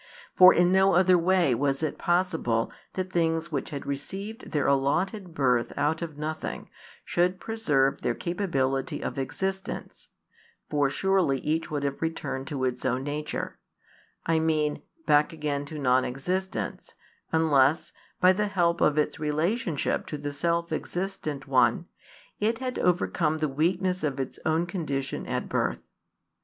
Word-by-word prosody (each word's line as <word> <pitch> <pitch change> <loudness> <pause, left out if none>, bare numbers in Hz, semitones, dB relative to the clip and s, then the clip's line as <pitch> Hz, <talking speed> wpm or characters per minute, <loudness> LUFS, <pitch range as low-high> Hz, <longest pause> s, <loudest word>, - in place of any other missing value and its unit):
For 185 0 +10
in 175 +1 +4
no 190 0 +4
other 185 0 +5
way 175 -4 +3
was 135 +4 0
it 155 - -2
possible 170 -11 +1 0.2
that 185 0 -4
things 165 0 +1
which 140 -3 -2
had 145 -3 -6
received 195 - -5
their 145 -2 0
allotted 170 +7 0
birth 125 -5 +2
out 150 +3 +1
of 160 -4 -5
nothing 155 +1 -5 0.3
should 180 +1 +1
preserve 150 -13 +1
their 120 - 0
capability 135 -8 -1
of - - -3
existence: 190 +8 -4 0.6
for 145 -2 +2
surely 185 -2 +2
each 160 +2 -1
would 145 -2 -2
have 140 -1 -2
returned 160 -4 -3
to 140 -4 -3
its 125 -1 -2
own 130 0 0
nature, 150 +1 -4 0.7
I 165 -1 +2
mean 155 -2 0 0.2
back 150 +2 +4
again 145 -2 -2
to 155 +2 -7
non 130 -2 +3
existence, 180 +9 -3 0.4
unless, 155 -2 +3 0.3
by 185 +1 +6
the 210 +2 0
help 175 -4 +1
of 150 0 +3
its 150 -1 0
relationship 155 - -1
to 150 - -4
the 145 0 -5
Self 170 +3 0
Existent 155 -4 -4
One, 130 +3 +3 0.5
it 225 +2 +1
had 255 0 -3
overcome 170 -3 +1
the 155 -1 0
weakness 180 +6 0
of 140 -3 -1
its 135 - -4
own 160 +2 +2
condition 150 -7 -3
at - - -2
birth. - - -1
155 Hz, 150 wpm, -27 LUFS, 140-180 Hz, 0.7 s, For